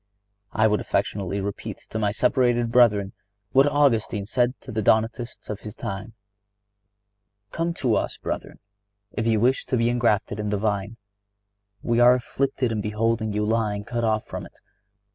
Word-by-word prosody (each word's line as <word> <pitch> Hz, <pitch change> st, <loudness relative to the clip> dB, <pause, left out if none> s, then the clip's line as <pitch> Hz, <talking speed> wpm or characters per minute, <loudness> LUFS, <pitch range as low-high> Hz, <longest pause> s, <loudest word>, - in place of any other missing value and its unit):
I 110 Hz, -, +2 dB
would 105 Hz, -1 st, +2 dB
affectionately 100 Hz, 0 st, -1 dB
repeat 100 Hz, 0 st, -5 dB
to 110 Hz, -, -2 dB
my 105 Hz, -2 st, +1 dB
separated 120 Hz, +1 st, +2 dB
brethren 105 Hz, -5 st, +4 dB, 0.4 s
what 135 Hz, +2 st, +5 dB
Augustine 120 Hz, -8 st, +2 dB
said 125 Hz, +4 st, 0 dB
to -, -, -9 dB
the 110 Hz, -1 st, -1 dB
Donatists 115 Hz, +3 st, 0 dB
of 105 Hz, -, -5 dB
his 105 Hz, -, -9 dB
time: 105 Hz, +4 st, -6 dB, 1.4 s
"Come 165 Hz, +1 st, -1 dB
to 125 Hz, -7 st, +1 dB
us, -, -, -1 dB
brethren -, -, -5 dB, 0.5 s
if 110 Hz, -, -2 dB
you 110 Hz, -2 st, +3 dB
wish 125 Hz, +4 st, +2 dB
to 130 Hz, -, +1 dB
be 115 Hz, 0 st, +2 dB
engrafted 105 Hz, -4 st, +1 dB
in 105 Hz, -1 st, -2 dB
the 105 Hz, -, 0 dB
vine. 105 Hz, +1 st, -2 dB, 0.9 s
We 120 Hz, 0 st, +1 dB
are 120 Hz, +1 st, +7 dB
afflicted 130 Hz, 0 st, -1 dB
in 110 Hz, -2 st, -1 dB
beholding 110 Hz, +1 st, 0 dB
you 105 Hz, 0 st, -1 dB
lying 105 Hz, -2 st, 0 dB
cut 120 Hz, +2 st, -3 dB
off 110 Hz, -1 st, +1 dB
from -, -, -6 dB
it. -, -, -24 dB
110 Hz, 160 wpm, -24 LUFS, 105-120 Hz, 1.4 s, are